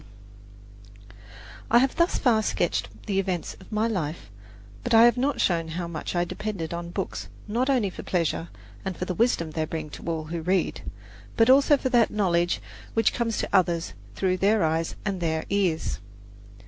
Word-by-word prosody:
CHAPTER 100 0 -20
XXI - - -20 0.5
I 235 - +6
have 260 +2 +3
thus 340 +1 +2
far 230 -5 +3
sketched 110 - -2
the 195 -1 0
events 185 -3 -2
of 190 - -16
my 215 +1 +1
life, 160 - -3 0.5
but 245 -1 +2
I 225 - +9
have 240 -1 +5
not 270 +3 0
shown 165 -3 +1
how 170 +2 -4
much 170 +1 -5
I - - +2
have 175 - -1
depended 190 -7 -4
on 170 0 -5
books 185 +1 -4 0.2
not 240 +5 0
only 240 -8 +2
for - - -8
pleasure 170 -1 -1 0.4
and 190 -2 -4
for 180 - -3
the 180 - -2
wisdom 175 -6 +1
they 155 0 -1
bring 155 -1 -5
to - - -9
all 165 -2 -1
who 165 +2 -5
read, 185 +3 0 0.6
but 225 +2 +6
also 280 +2 +6
for 260 - -2
that 240 -3 +4
knowledge 175 -4 +1 0.3
which 225 -1 +3
comes 230 -2 -1
to - - -2
others 175 -3 +2 0.2
through 185 -1 +1
their 205 +2 +3
eyes 160 +1 0
and 195 -3 -2
their 160 -1 -1
ears. 175 - 0
180 Hz, 190 wpm, -26 LUFS, 160-220 Hz, 0.6 s, I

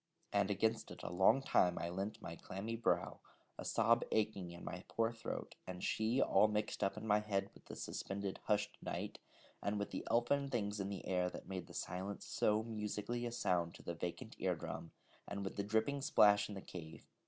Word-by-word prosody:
And 100 -1 +3
against 110 +3 +1
it - - -9
a - - -3
long 95 +9 +5
time 90 -8 +4
I 85 - -1
leant 105 +4 -3
my 85 - -5
clammy 100 +7 -4
brow, 115 - +1 0.4
a - - -3
sob 115 +1 +4
aching 105 -4 +1
in 85 0 -9
my 90 0 -5
poor 115 0 +1
throat, 115 -1 -5
and 90 -1 -5
she 110 +4 +2
all 110 - +6
mixed 105 0 -1
up 95 +1 +1
in 110 - -5
my 105 -1 +5
head 105 -2 -1
with - - -18
the - - -8
suspended 100 0 -3
hushed 105 -1 +1
night, - - -4 0.4
and 100 +1 0
with 100 - -2
the - - -3
elfin 130 +5 +3
things 105 -5 -1
in 95 0 -1
the 100 - -5
air 90 -1 +1
that - - -9
made 95 -2 -4
the - - -11
silence 95 +2 -3
so 105 +1 +2
musically 110 +2 -2
a - - -4
sound 90 -7 +1
to - - -12
the 85 - -3
vacant 85 +1 -4
ear - - +2
drum, 85 - -5 0.4
and 100 0 -3
with 95 - -4
the 100 - -1
dripping 110 +7 +1
splash 105 -5 +6
in 105 - -5
the 95 - -5
cave. 80 -4 -9
105 Hz, 210 wpm, -38 LUFS, 95-110 Hz, 0.4 s, all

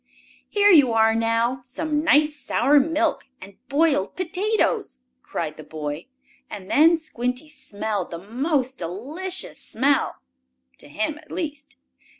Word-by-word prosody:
"Here 410 0 +5
you 285 -9 +6
are 225 0 +4
now! 230 +3 +1
Some 300 +4 -2
nice 305 -1 +4
sour 290 +1 +3
milk, 320 +3 0
and 190 0 -13
boiled 285 -8 +2
potatoes!" 400 - -1 0.2
cried 155 -2 -4
the 155 - -9
boy, 150 +2 -6 0.4
and 195 -2 -8
then 330 +3 +6
Squinty 250 -2 -3
smelled 220 - -4
the 170 - -6
most 260 - -2
delicious 290 - -4
smell 275 +4 +1 0.6
to - - -11
him 215 - -3
at 310 - -18
least. 295 -3 -5
275 Hz, 130 wpm, -23 LUFS, 220-315 Hz, 0.6 s, you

